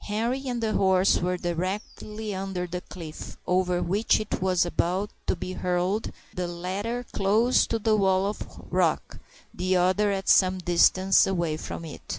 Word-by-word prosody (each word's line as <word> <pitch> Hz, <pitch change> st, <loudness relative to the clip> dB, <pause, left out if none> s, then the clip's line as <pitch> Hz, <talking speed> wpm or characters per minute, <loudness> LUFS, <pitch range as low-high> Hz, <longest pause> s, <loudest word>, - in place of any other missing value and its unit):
Henri 235 Hz, +6 st, -2 dB
and 240 Hz, -2 st, -2 dB
the 215 Hz, -1 st, 0 dB
horse 190 Hz, 0 st, +3 dB
were 180 Hz, +1 st, -1 dB
directly 200 Hz, +4 st, -4 dB
under 190 Hz, -1 st, -3 dB
the 180 Hz, 0 st, -5 dB
cliff 165 Hz, -4 st, -9 dB
over 180 Hz, -1 st, +1 dB
which 200 Hz, +6 st, +2 dB
it 215 Hz, -3 st, -4 dB
was 185 Hz, -2 st, +2 dB
about 180 Hz, +4 st, -1 dB, 0.2 s
to -, -, +2 dB
be 185 Hz, -, -5 dB
hurled, 180 Hz, +4 st, -1 dB, 0.2 s
the 180 Hz, -1 st, -2 dB
latter 195 Hz, +8 st, -4 dB
close 220 Hz, +6 st, +3 dB
to 230 Hz, -, 0 dB
the 220 Hz, 0 st, +2 dB
wall 190 Hz, -2 st, +2 dB
of 205 Hz, +1 st, -6 dB
rock, -, -, 0 dB, 0.3 s
the 185 Hz, +1 st, 0 dB
other 185 Hz, +4 st, +2 dB
at 195 Hz, -1 st, -3 dB
some 185 Hz, -1 st, +5 dB
distance 185 Hz, +2 st, +4 dB
away 170 Hz, -5 st, 0 dB
from 160 Hz, +1 st, -6 dB
it. 155 Hz, -, -9 dB
190 Hz, 165 wpm, -26 LUFS, 180-210 Hz, 0.3 s, some